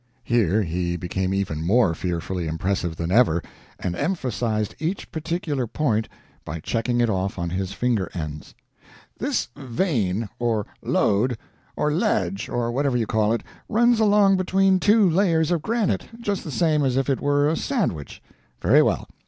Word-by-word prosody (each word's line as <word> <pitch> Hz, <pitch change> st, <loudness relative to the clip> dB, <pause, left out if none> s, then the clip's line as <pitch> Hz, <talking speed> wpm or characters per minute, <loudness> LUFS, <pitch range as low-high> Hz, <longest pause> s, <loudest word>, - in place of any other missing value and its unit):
[Here 110 Hz, -4 st, +2 dB
he 85 Hz, 0 st, -2 dB
became 95 Hz, +2 st, -2 dB
even 95 Hz, -5 st, -2 dB
more 95 Hz, 0 st, +3 dB
fearfully 85 Hz, +1 st, -3 dB
impressive 85 Hz, +1 st, -2 dB
than 85 Hz, +1 st, -3 dB
ever, 95 Hz, -7 st, +4 dB, 0.4 s
and 90 Hz, -1 st, -2 dB
emphasized 120 Hz, -, -1 dB
each 170 Hz, +5 st, -3 dB
particular 155 Hz, -5 st, -2 dB
point 110 Hz, -4 st, 0 dB, 0.3 s
by 80 Hz, +2 st, -5 dB
checking 115 Hz, +8 st, -1 dB
it 120 Hz, -, +3 dB
off 95 Hz, -2 st, -1 dB
on 85 Hz, -1 st, -3 dB
his 95 Hz, +1 st, -2 dB
finger 115 Hz, -7 st, 0 dB
ends.] 75 Hz, -3 st, -6 dB, 0.6 s
"This -, -, -1 dB
vein, 115 Hz, -, -1 dB
or 115 Hz, -3 st, 0 dB, 0.2 s
lode, 115 Hz, +4 st, +1 dB, 0.4 s
or 150 Hz, -, 0 dB
ledge, 105 Hz, -, 0 dB
or 120 Hz, -1 st, -1 dB
whatever 135 Hz, 0 st, +1 dB
you 115 Hz, -, 0 dB
call 110 Hz, 0 st, +1 dB
it, 115 Hz, -, -1 dB, 0.3 s
runs 235 Hz, +1 st, +3 dB
along 205 Hz, -2 st, +5 dB
between 190 Hz, +1 st, +3 dB
two 210 Hz, +1 st, +5 dB
layers 165 Hz, -2 st, +2 dB
of 170 Hz, -3 st, +1 dB
granite, 225 Hz, +3 st, 0 dB
just 205 Hz, -4 st, -2 dB
the -, -, -7 dB
same 155 Hz, -2 st, +2 dB
as 130 Hz, -1 st, +1 dB
if 135 Hz, -, +1 dB
it 135 Hz, -2 st, 0 dB
were 145 Hz, 0 st, +2 dB
a 160 Hz, -, +1 dB
sandwich. 160 Hz, -, -2 dB, 0.4 s
Very -, -, +5 dB
well. -, -, 0 dB
120 Hz, 160 wpm, -23 LUFS, -, 0.6 s, along